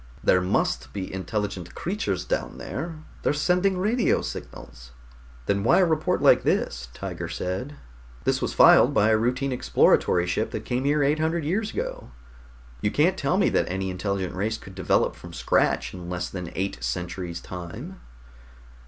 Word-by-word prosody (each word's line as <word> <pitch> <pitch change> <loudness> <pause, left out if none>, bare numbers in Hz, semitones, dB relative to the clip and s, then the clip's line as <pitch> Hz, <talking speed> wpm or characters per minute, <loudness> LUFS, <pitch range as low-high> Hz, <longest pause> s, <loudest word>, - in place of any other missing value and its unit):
"There 90 - +4
must 90 - 0
be 95 -2 -5
intelligent 95 -1 -4
creatures 105 - -2
down - - -2
there. 155 +1 -6 0.2
They're - - +1
sending 180 +5 +2
radio 215 +5 +1
signals." - - -8 0.5
"Then 100 +5 0
why 115 - +5
a 190 - +5
report 160 -2 0
like - - +6
this?" 60 +1 -1
Tiger - - -5
said. 95 +11 -4 0.5
"This - - +1
was - - -1
filed - - +7
by 105 - +4
a 110 - +4
routine 130 +4 0
exploratory 90 -7 +3
ship 100 +5 -1
that 110 - -4
came 125 +2 -1
here 145 +1 +3
eight 145 +3 +2
hundred 160 +1 0
years 205 +7 0
ago. - - -5 0.7
You 105 - +1
can't 160 - +2
tell 175 +1 0
me 200 - +3
that - - +1
any 95 +1 -2
intelligent 95 0 -2
race 110 +4 -1
could 95 - -12
develop 95 -2 +1
from - - -11
scratch - - +1
in 90 -1 -8
less 90 -1 -3
than 90 -3 -6
eight 95 -10 -3
centuries' 85 +6 -3
time." 90 -8 -8
105 Hz, 165 wpm, -25 LUFS, 90-150 Hz, 0.7 s, filed